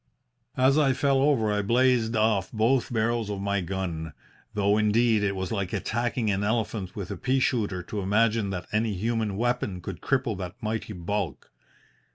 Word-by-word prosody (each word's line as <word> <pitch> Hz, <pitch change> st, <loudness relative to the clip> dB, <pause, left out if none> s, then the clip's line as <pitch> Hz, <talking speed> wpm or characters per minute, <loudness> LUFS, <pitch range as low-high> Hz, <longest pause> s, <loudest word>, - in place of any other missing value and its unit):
"As 135 Hz, +3 st, +4 dB
I 135 Hz, -3 st, +4 dB
fell 135 Hz, 0 st, +2 dB
over 130 Hz, -7 st, +3 dB
I 105 Hz, -, +1 dB
blazed 120 Hz, +1 st, +2 dB
off 110 Hz, -4 st, +1 dB
both 120 Hz, +4 st, +1 dB
barrels 115 Hz, -1 st, 0 dB
of 100 Hz, -1 st, -3 dB
my 100 Hz, 0 st, 0 dB
gun, 85 Hz, -4 st, -4 dB, 0.4 s
though, 100 Hz, 0 st, +3 dB
indeed, 110 Hz, +1 st, +3 dB
it 100 Hz, -1 st, 0 dB
was 95 Hz, -1 st, -3 dB
like 100 Hz, -4 st, -2 dB
attacking 120 Hz, -1 st, -1 dB
an 100 Hz, +1 st, -1 dB
elephant 105 Hz, -3 st, -2 dB
with 100 Hz, -3 st, -5 dB
a -, -, -4 dB
pea 135 Hz, 0 st, +1 dB
shooter 105 Hz, -8 st, 0 dB
to 105 Hz, -, -5 dB
imagine 105 Hz, +2 st, +2 dB
that 90 Hz, -2 st, -4 dB
any 105 Hz, -1 st, 0 dB
human 110 Hz, 0 st, -1 dB
weapon 120 Hz, -5 st, -1 dB
could 90 Hz, 0 st, -7 dB
cripple 130 Hz, -5 st, 0 dB
that 90 Hz, 0 st, -5 dB
mighty 110 Hz, -1 st, -3 dB
bulk. 100 Hz, +3 st, -4 dB
110 Hz, 175 wpm, -26 LUFS, 100-120 Hz, 0.4 s, As